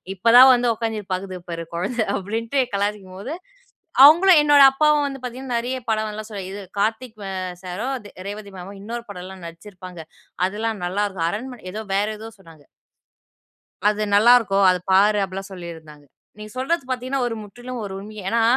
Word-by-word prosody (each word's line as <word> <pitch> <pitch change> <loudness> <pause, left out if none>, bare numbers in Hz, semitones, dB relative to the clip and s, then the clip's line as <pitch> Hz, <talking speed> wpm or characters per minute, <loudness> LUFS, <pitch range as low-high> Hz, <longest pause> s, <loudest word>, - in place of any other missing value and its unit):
இப்போ 225 +5 +1
தான் 260 +1 +10
வந்து 245 -1 +2
உட்கார்ந்து 225 -1 -3
இது 195 - -22
பாக்குது 185 0 -5
பாரு 165 0 -5
குழந்தை" 215 +6 -1
அப்பிடீன்ட்டு 225 +7 -1
கலாய்ச்சிக்கும்போது, 200 - -3 0.7
அவுங்களும், 340 +3 +7
என்னோட 290 -1 +7
அப்பாவும் 300 +1 +3
வந்து 270 -1 -7
பாத்தீங்கன்னா, 250 0 -5
நெறைய 250 +2 -3
படம் 215 0 0
நல்லா 215 +1 -7
சொல். 200 -2 -5
இது 200 - -7 0.2
கார்த்திக் 220 +2 -2
அ - - -4 0.3
சாரும், 210 +9 -3
த - - -10 0.2
ரேவதி 205 0 -8
மேமும் 195 +2 -9
இன்னொரு 235 +2 -6
படம்லாம் 185 -1 -9
நடிச்சிருப்பாங்க. 180 +1 -11 0.5
அதெல்லாம் 215 0 -3
நல்லா 205 +3 0
இருக்கும். 185 -4 -2
அரண்மனை, 245 +5 -6
ஏதோ 215 - -4
வேற 205 +1 +1
ஏதோ 225 +1 -8
சொன்னாங்க. 165 -5 -18 1.2
"அது 210 0 0
நல்லா 220 +4 +7
இருக்கும். 200 -4 +1
அத 180 - +1
பாரு" 205 +2 +5
அப்பிடீலாம் 195 +1 -7
சொல்லிருந்தாங்க. 160 -5 -10 0.3
நீங்க 215 0 -9
சொல்றது 300 +4 -1
பாத்தீங்கன்னா 255 +2 -2
ஒரு 235 - -2
முற்றிலும் 245 +4 -8
ஒரு 200 - -6
உண்மையே. 210 +1 -9
ஏன்னா, 230 +2 +2
210 Hz, 170 wpm, -22 LUFS, 190-245 Hz, 1.2 s, தான்